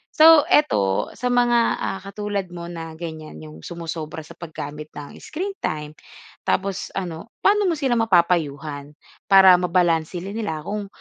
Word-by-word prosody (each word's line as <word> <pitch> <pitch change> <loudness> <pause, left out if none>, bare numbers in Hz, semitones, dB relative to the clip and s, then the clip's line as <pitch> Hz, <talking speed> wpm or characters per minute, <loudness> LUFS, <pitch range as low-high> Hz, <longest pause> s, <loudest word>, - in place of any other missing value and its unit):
So 315 -1 +8
ito, 100 - +2
sa 250 - -2
mga, 240 -1 +4 0.2
ah, 195 - -3
katulad 200 -1 -4
mo 170 -1 -7
na 165 -2 -7
ganyan, 155 - -7
'yong 80 0 -12
sumosobra 165 -2 -6
sa 160 +2 -11
paggamit 155 -2 -8
ng 145 -1 -9
screen 385 +5 -4
time, 150 0 -3 0.5
tapos 195 0 -1
ano, 175 +4 -7
paano 415 +1 +3
mo 340 - +1
sila 265 -4 +1
mapapayuhan 155 -8 +1 0.4
para 190 -1 +9
mabalanse 175 -1 +1
rin 200 +2 -6
nila 205 -9 -3
kung, 205 -1 -3
175 Hz, 145 wpm, -22 LUFS, 155-210 Hz, 0.5 s, para